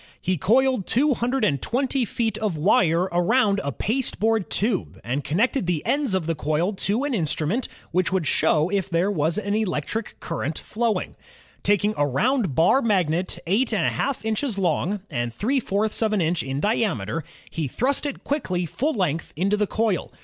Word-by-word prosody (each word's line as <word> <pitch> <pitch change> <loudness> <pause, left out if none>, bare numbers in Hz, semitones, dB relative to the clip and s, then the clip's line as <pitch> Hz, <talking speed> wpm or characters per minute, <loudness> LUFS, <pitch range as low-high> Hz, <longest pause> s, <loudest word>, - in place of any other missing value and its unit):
He 185 - 0
coiled 240 - +2
220 250 - +1
feet 225 -1 -1
of 210 -7 -1
wire 175 0 +3
aroimd 200 +4 +3
a 140 - -2
pasteboard 225 - 0
tube 210 -2 -1
and 130 +5 -2
connected 220 - 0
the 170 -4 -1
ends 280 -8 +1
of 185 -4 -1
the 165 - 0
coil 155 +6 0
to 205 +6 -1
an 290 -2 -1
instrument 175 - 0 0.2
which 185 +2 +1
would 185 -4 0
show 155 +2 +3
if 195 -1 -1
there 175 +3 +1
was 160 -1 0
an 205 -1 -1
electric 210 0 -2
current 160 -2 -3
flowing. 230 0 -2 0.5
Taking 205 +1 +2
a 145 - +2
round 205 - +1
bar 175 +12 +4
magnet 185 - 0
eight 215 +9 +1
and 215 - +1
a - - +3
half 275 -5 -2
inches 220 +1 -1
long 185 +2 0
and 120 -6 -2
three 245 - 0
fourths 215 -1 0
of 220 -1 +2
an 210 - +2
inch 165 0 +1
in 135 +1 -3
diameter, 165 - 0 0.3
he 160 -3 -2
thrust 265 - 0
it 280 - -6
quickly 185 - -1
full 280 - -1
length 170 -6 -1
into 195 +6 +1
the 210 0 0
coil. 215 -4 -1
200 Hz, 170 wpm, -24 LUFS, 165-230 Hz, 0.5 s, bar